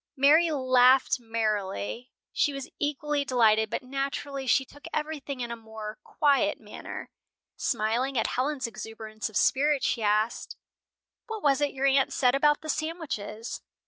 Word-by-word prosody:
Mary 305 +5 +5
laughed 255 -3 +4
merrily. 215 - -2 0.2
She 290 - +1
was 275 -1 -7
equally 295 0 -1
delighted 220 -5 +3
but - - -3
naturally 275 +1 -4
she 265 +2 +3
took 290 +2 -16
everything 300 -3 -4
in 240 -1 -3
a - - -3
more 220 -1 -8
quiet 285 -3 +2
manner. - - -8 0.4
Smiling 240 +5 0
at 225 - +2
Helen's 265 +1 -1
exuberance 220 -1 -6
of 215 - -3
spirit, 285 +1 +3
she 235 - 0
asked, 215 +2 0 0.7
"What 445 -2 -6
was 280 -1 +3
it 290 -1 0
your 270 +1 0
aunt 275 0 +3
said 250 -2 +3
about 295 +2 +3
the 315 - -9
sandwiches?" 305 -10 -4
260 Hz, 145 wpm, -27 LUFS, 225-285 Hz, 0.7 s, Mary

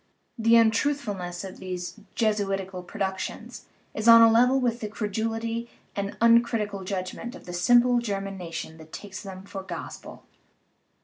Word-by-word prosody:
The 230 -1 +4
untruthfulness 220 -6 +1
of 190 -1 -8
these 185 +2 -6 0.2
Jesu 215 -3 +1
itical 190 -2 -4
productions 190 -3 -5 0.3
is 215 +1 -3
on 230 0 +10
a 225 - +7
level 250 +4 +4
with 240 -2 0
the 215 - -4
credulity 225 +2 -3 0.3
and 200 0 -2
the - - -11
uncritical 230 -4 +3
judgment 190 +6 -5
of - - -13
the 175 - -7
simple 240 +7 +4
German 195 -4 -3
nation 165 -3 -6
that 160 0 -14
takes 200 -2 -8
them 190 -1 -9
for 195 0 -7
gospel. 190 - -8
210 Hz, 150 wpm, -26 LUFS, 190-230 Hz, 0.3 s, on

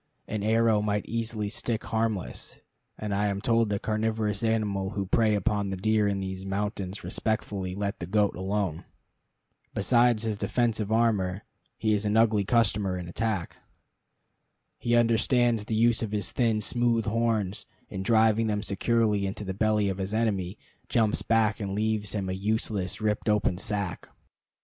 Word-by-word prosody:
An 105 -1 -3
arrow 110 0 +3
might 105 -1 -1
easily 115 -2 -2
stick 110 +1 -2
harmless; 110 -3 -3 0.4
and 105 -1 -3
I 105 +1 +1
am 100 -1 -1
told 115 -1 +2
that 100 -1 -2
carnivorous 110 -1 -1
animals 105 -3 0
who 100 -1 -1
prey 110 +2 +2
upon 100 0 0
the 95 - -3
deer 110 +2 +2
in 100 -1 -1
these 95 0 -5
mountains 100 0 -3
respectfully 100 -4 -2
let 100 +1 -3
the 85 - -5
goat 105 +1 +2
alone. 95 -2 -2 0.9
Besides 120 +1 +3
his 110 -2 -2
defensive 115 -4 0
armor, 105 -4 +1 0.3
he 110 -1 +1
is 105 0 0
an 105 +1 +1
ugly 110 -2 +4
customer 100 -4 +1
in 90 -1 -6
attack. 100 -1 -2 1.2
He 120 0 +1
understands 120 -1 +3
the 110 - -2
use 115 +1 +3
of 110 -2 -3
his 105 -3 -1
thin, 115 -4 +1
smooth 120 0 +1
horns, 110 -3 -1 0.2
and, 95 - -5
driving 110 0 +3
them 105 -1 -1
securely 105 -1 +1
into 95 +2 -5
the 95 - -3
belly 105 +1 +2
of 95 -1 -2
his 95 +3 -2
enemy, 100 -4 -1 0.3
jumps 110 -3 +2
back 110 -2 +2
and 100 -2 -3
leaves 110 -1 -1
him 100 -2 -2
a 95 - -2
useless, 105 0 -2
ripped 105 0 0
open 105 -4 +1
sack. 100 -4 -3
105 Hz, 160 wpm, -27 LUFS, 100-110 Hz, 1.2 s, ugly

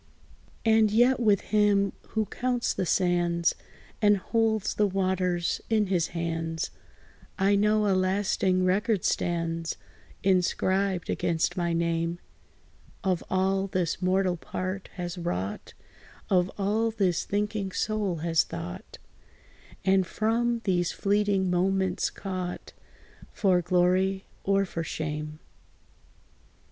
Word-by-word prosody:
And 220 -1 +5
yet, 245 +4 +4
with 210 -5 +3
Him, 205 -2 +2
who 220 -1 -1
counts 245 +2 -1
the 185 - -2
sands, 175 -1 +2 0.5
And 205 -1 +5
holds 220 +1 0
the 210 - +2
waters 185 -2 0
in 220 -2 +3
his 170 -2 +2
hands, 165 -1 -3 0.7
I 200 +1 +3
know 210 +1 +3
a 200 - +3
lasting 185 -1 +1
record 200 +2 +1
stands, 165 -1 -1 0.5
Inscribed 190 0 +1
against 165 -1 0
my 175 -1 0
name, 165 0 0 0.9
Of 185 -3 0
all, 190 +1 +1
this 180 -2 -1
mortal 185 -1 +1
part 185 +3 -5
has 175 0 -5
wrought; 95 - -4 0.6
Of 180 -1 +3
all, 210 +3 +1
this 190 -6 0
thinking 205 -1 -2
soul 210 -3 -1
has 165 -1 +3
thought; 85 +1 -8 0.9
And 190 -1 +3
from 230 +3 0
these 175 -3 +1
fleeting 200 -1 +1
moments 190 +1 +1
caught 185 -2 -5 0.6
For 185 -3 +2
glory, 185 +2 +2 0.2
or 195 0 +2
for 165 -2 -4
shame. 150 -1 -4
190 Hz, 110 wpm, -27 LUFS, 175-205 Hz, 0.9 s, And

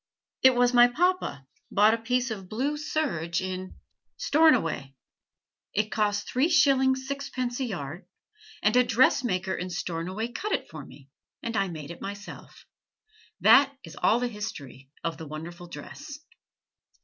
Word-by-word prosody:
It 260 -1 +6
was 245 0 +3
my 240 0 +8
papa 300 - 0 0.2
bought 210 +2 +5
a - - +1
piece 250 +2 0
of 195 -4 -6
blue 270 +7 -1
serge 275 - -1
in 185 0 -5 0.4
Stornoway: 235 - +2 0.8
it 215 +1 0
cost 205 -1 0
three 270 +7 +1
shillings 265 -4 +3
sixpence 260 -3 -3
a 265 - 0
yard, 170 - -6 0.6
and 210 +2 +3
a 250 - +6
dressmaker 230 -6 +2
in 180 +1 -4
Stornoway 180 +5 -3
cut 395 - -3
it - - -1
for 155 -2 -8
me, 135 0 -15 0.3
and 230 -1 -3
I 195 -1 +1
made 155 -3 -7
it 170 - -10
myself. 200 +1 -9 0.8
That 280 0 +6
is 165 -3 -11
all 230 - +3
the 245 - 0
history 160 - -7
of 165 -1 -3
the 160 - -7
wonderful 170 +4 -8
dress." 290 - -9
215 Hz, 150 wpm, -27 LUFS, 175-260 Hz, 0.8 s, my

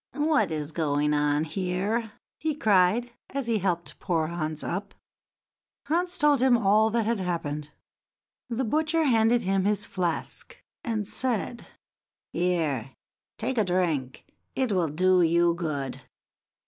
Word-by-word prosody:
"What 300 - +2
is 150 -1 -3
going 150 -2 +1
on 145 0 +2
here?" 195 +6 -2 0.3
he 310 -1 -1
cried, 215 0 +3 0.2
as 275 -2 -3
he 230 -2 +1
helped 175 -3 -2
poor 165 -4 0
Hans 155 -2 -3
up. 195 +3 -4 0.9
Hans 350 +4 0
told 295 -5 +4
him 255 -2 +5
all 215 0 +4
that 230 0 0
had 230 -1 0
happened. 150 -5 -3 0.8
The 245 +2 -1
butcher 315 +6 +1
handed 235 -3 +3
him 195 0 +1
his 210 0 +1
flask, 175 -5 -3 0.3
and 215 -4 -2
said: 240 0 -2 0.7
"Here, 155 -8 -1 0.4
take 245 +2 -1
a - - +4
drink, 170 -9 -1 0.3
it 260 -4 0
will 180 -5 +1
do 185 +4 +3
you 170 +1 +4
good. 155 -6 -3
190 Hz, 135 wpm, -27 LUFS, 165-235 Hz, 0.9 s, him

